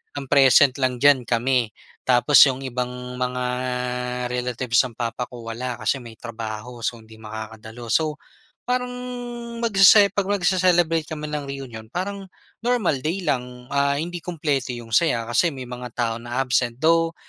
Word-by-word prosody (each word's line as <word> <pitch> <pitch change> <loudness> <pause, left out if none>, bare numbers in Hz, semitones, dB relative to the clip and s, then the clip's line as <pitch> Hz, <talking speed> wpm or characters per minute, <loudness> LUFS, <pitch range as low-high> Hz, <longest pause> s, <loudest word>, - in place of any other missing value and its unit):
ang 140 -1 -5
present 135 -1 +6
lang 130 -1 +1
diyan 140 -3 +5
kami 120 -1 +1 0.4
tapos 130 +3 +3
'yong 135 0 -2
ibang 125 0 -4
mga 125 0 -1 0.9
relatives 125 -1 0
ng 130 - -5
papa 120 +2 -3
ko 120 -2 -10
wala 120 +1 -4
kasi 140 - 0
may 115 -1 -11
trabaho, 115 +1 -7
so 115 +1 -2
hindi 110 0 -15
makakadalo. 110 +2 -8
So, 155 +2 +2 0.5
parang 250 0 0 0.7
magsese 200 -1 +7
'pag 200 -2 -1
magse-celebrate 180 -4 +2
kami 150 -2 -5
ng 150 -1 -2
reunion, 130 -5 -7
parang 195 +2 -4 0.3
normal 235 - +1
day 170 +7 -2
lang. 125 -3 -3
Ah, 140 0 +2
hindi 175 +2 -4
kumpleto 150 -6 -2
'yong 115 -1 -10
saya 120 -8 +3
kasi 145 +9 +3
may 135 -4 -7
mga 125 0 -6
tao 115 -2 0
na 120 +2 -4
absent, 125 -2 0
though 165 +1 +3
130 Hz, 155 wpm, -23 LUFS, 120-160 Hz, 0.9 s, magsese